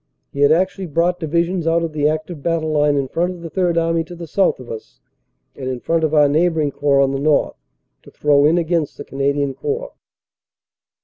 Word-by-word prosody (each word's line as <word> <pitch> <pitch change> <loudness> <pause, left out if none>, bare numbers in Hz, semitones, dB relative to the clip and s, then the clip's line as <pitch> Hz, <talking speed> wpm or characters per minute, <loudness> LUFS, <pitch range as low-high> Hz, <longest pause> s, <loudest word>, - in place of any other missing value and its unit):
He 140 - -7
had 145 +1 +5
actually 185 +3 +1
brought 170 +3 0
divisions 170 +2 -1
out 165 +1 +2
of 165 -2 -4
the 150 -1 +2
active 155 0 -4
battle 165 0 -1
line 150 -1 +2
in 135 -1 -1
front 175 +6 -1
of 175 - -12
the 165 - -7
Third 175 -1 0
Army 165 0 +1
to 175 +1 -10
the 170 0 -8
south 190 +1 +1
of 125 - -10
us 110 - -9 0.6
and 130 -2 -5
in 130 -1 -3
front 165 +5 0
of 155 - +1
our 150 -1 +6
neighboring 155 0 +1
Corps 140 0 +2
on 135 -1 +2
the 135 - -2
north 150 0 +1 0.5
to - - -16
throw 145 -1 +2
in 160 +3 +4
against 165 -3 -1
the 145 - -8
Canadian 140 0 -1
Corps. 470 - -4
155 Hz, 210 wpm, -19 LUFS, 145-170 Hz, 0.6 s, our